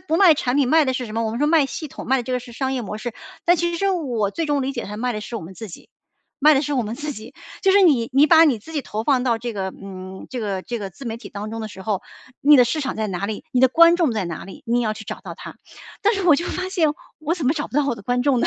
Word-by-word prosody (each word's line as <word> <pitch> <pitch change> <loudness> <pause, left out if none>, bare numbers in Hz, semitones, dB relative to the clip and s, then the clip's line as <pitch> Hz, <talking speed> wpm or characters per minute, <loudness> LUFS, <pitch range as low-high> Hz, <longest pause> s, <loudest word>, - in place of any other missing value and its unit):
不 315 +1 -1
卖 355 -3 +7
产 260 -2 -1
品， 280 - +3
卖 320 +1 +5
的 260 - 0
是 250 -2 -3
什 215 - -8
么？ 230 - 0
我 220 - -1
们 230 - -4
说 295 - +2
卖 310 -1 +4
系 310 +3 -6
统 - - -9
卖 265 - +4
的 255 - -1
这 255 - -4
个 250 - 0
是 240 0 -12
商 265 +2 -2
业 255 -2 -2
模 210 0 -6
式。 235 +1 -5 0.3
但 350 +1 +5
其 345 +1 0
实 340 - -3
是 395 - +1
我 245 - -1
最 330 - -2
终 290 -2 +1
理 270 - -2
解 240 - -4
它 205 +2 -7
卖 245 +2 -1
的 215 - -4
是 230 +2 -6
我 - - -5
们 180 +3 -10
自 220 +2 -8
己， - - -12 0.5
卖 305 +2 +7
的 275 - +2
是 295 - -2
我 260 -3 +1
们 220 +1 -4
自 300 +1 -4
己。 220 -1 -10 0.3
就 385 - +4
是 400 0 +6
你 265 -10 +3
你 280 +3 +6
把 320 +1 +7
你 275 -8 +2
自 320 +10 -13
己 295 -3 -2
投 215 -2 -4
放 265 -2 +3
到 235 -3 +1
这 240 +1 -4
个， 195 -2 -3
嗯， 190 -1 -9
这 255 - -5
个 200 -3 -2
这 240 - -4
个 195 - -5
自 195 +9 -12
媒 225 -2 -4
体 230 - -10
当 210 +1 -6
中 225 - -4
的 220 - -5
时 190 -2 -10
候， 200 -2 -2 0.4
你 295 +1 +7
的 250 - +7
市 305 +6 -1
场 270 - -3
在 220 -1 -1
哪 195 0 -3
里、 215 0 -5
你 250 - +2
的 260 - +6
观 335 +4 +6
众 335 -6 +2
在 210 -4 -1
哪 170 -2 -6
里， 190 - -12
你 240 +1 +2
也 - - 0
要 215 - 0
去 220 - -9
找 - - -6
到 - - -7
他。 - - -10 0.5
但 425 +3 +3
是 390 - -2
我 330 - +7
就 325 +4 -1
发 370 +1 -3
现， 340 -5 +2 0.3
我 310 +1 -1
怎 325 -7 -3
么 270 - +4
找 295 -2 -3
不 - - -16
到 295 -1 +3
我 265 - 0
的 210 - -12
观 245 +4 0
众 260 -2 +2
呢？ - - +2
250 Hz, 365 characters per minute, -22 LUFS, 220-300 Hz, 0.5 s, 卖